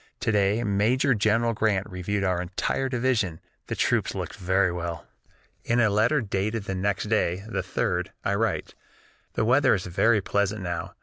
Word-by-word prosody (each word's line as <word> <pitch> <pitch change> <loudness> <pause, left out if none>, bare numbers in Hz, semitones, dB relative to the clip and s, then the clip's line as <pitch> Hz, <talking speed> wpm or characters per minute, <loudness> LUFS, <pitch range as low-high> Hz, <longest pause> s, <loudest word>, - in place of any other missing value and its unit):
To - - +1
day 105 +2 +2
Major 115 +6 +2
General 115 +2 +2
Grant 105 -3 0
reviewed 95 +1 -2
our 90 -2 +1
entire 95 +8 -2
division; 120 -9 0 0.3
the - - -3
troops - - +1
looked - - -4
very 95 0 +1
well." 85 -1 -5 0.6
In 120 +1 +1
a 110 -3 +4
letter 115 +8 +3
dated 105 +1 -2
the 95 - -4
next 95 +1 -1
day, 95 -4 0
the 100 -4 -2
3d, 90 - -1 0.2
I - - +1
write: - - -1 0.6
"The - - 0
weather 130 +2 +4
is 90 - -4
very 105 +5 +3
pleasant 100 0 -1
now. 85 -1 -4
100 Hz, 170 wpm, -26 LUFS, 95-115 Hz, 0.6 s, a